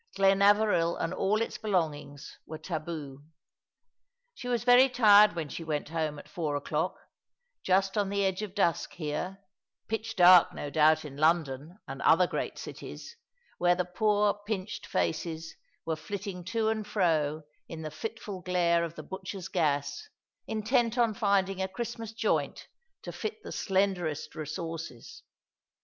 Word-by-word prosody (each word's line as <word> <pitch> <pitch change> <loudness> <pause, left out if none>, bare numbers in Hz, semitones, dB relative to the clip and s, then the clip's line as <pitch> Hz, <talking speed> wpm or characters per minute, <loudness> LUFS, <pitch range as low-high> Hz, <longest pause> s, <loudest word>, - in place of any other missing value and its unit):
Glenaveril 195 -2 +4
and 165 +2 -2
all 210 +4 +1
its - - -6
belongings 155 -8 -3
were 155 - -6
taboo. 155 -5 -6 1.1
She 245 - -8
was 240 -2 0
very 250 +2 +7
tired 210 -4 +6
when 165 -3 -4
she 165 - -6
went 150 -2 -3
home 155 -2 -2
at 145 - -11
four 150 -1 -3
o'clock, 145 - -2 0.6
just 195 +2 +2
on 200 -1 0
the 200 0 0
edge 190 +1 -1
of 205 -3 -6
dusk 175 -5 +1
here 180 +5 -4 0.2
— - - -62
pitch 225 +1 -3
dark, 180 -2 +7
no 145 - -5
doubt, 155 +1 +4
in 140 -2 -9
London 155 0 +1
and 135 0 -7
other 175 +3 +5
great - - -4
cities, 470 - -9 0.4
where 175 0 +4
the 180 0 -1
poor, 210 +2 +2
pinched 210 -1 -4
faces 160 - -2 0.3
were 160 -1 -1
flitting 185 +3 -6
to 220 +3 0
and 220 -1 -2
fro 155 -6 +1 0.3
in 160 -1 -7
the 155 - -5
fiftful 205 +3 -6
glare 170 -2 +2
of 170 -1 -5
the - - -8
butcher's 190 0 -7
gas, 145 -5 -1 0.4
intent 230 +2 +1
on 235 -2 +3
finding 195 -3 +1
a 190 - 0
Christmas 230 +1 -5
joint 225 - -1 0.4
to - - -6
fit 440 0 -5
the - - -8
slenderest 190 -6 -1
resources. 160 -4 -6
180 Hz, 150 wpm, -29 LUFS, 160-205 Hz, 1.1 s, very